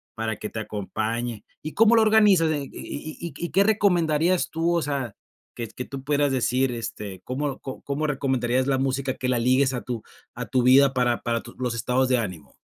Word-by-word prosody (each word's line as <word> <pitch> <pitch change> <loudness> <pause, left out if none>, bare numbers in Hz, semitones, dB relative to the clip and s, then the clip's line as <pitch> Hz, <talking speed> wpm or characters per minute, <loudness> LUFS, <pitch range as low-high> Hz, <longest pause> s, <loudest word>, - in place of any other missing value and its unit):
para 110 -1 -2
que 105 - -6
te 110 - -5
acompañe. 110 +2 -3 0.2
¿Y 155 - -6
cómo 225 +1 +5
lo 225 - +6
organizas 210 -7 +5
en 145 -2 -1
y - - -8
y 155 +2 -7
y 170 -4 -5
y 175 - -4
qué 195 +4 +4
recomendarías 180 -5 +2
tú, 165 +2 0
o 170 - +2
sea, 135 -7 -3 0.4
que 115 -2 -5
que 125 +3 -7
tú 135 -1 -8
puedas 145 0 +2
decir, 130 0 +1
este, 105 -5 -6
cómo 135 +2 -3
co 130 - -7
cómo 145 +2 -2
recomendarías 130 -3 0
la 135 -1 +2
música 135 0 -1
que 125 - -2
la 125 -2 +2
ligues 130 +2 +3
a 125 - -3
tu 120 -3 -5 0.3
a - - -4
tu 130 - +1
vida 135 +2 +6
para 120 -2 +1
para 115 -1 -1
tu 120 - -13
los 125 -2 -2
estados 125 +3 0
de 125 - +3
ánimo? 90 -9 -5
130 Hz, 215 wpm, -25 LUFS, 120-150 Hz, 0.4 s, lo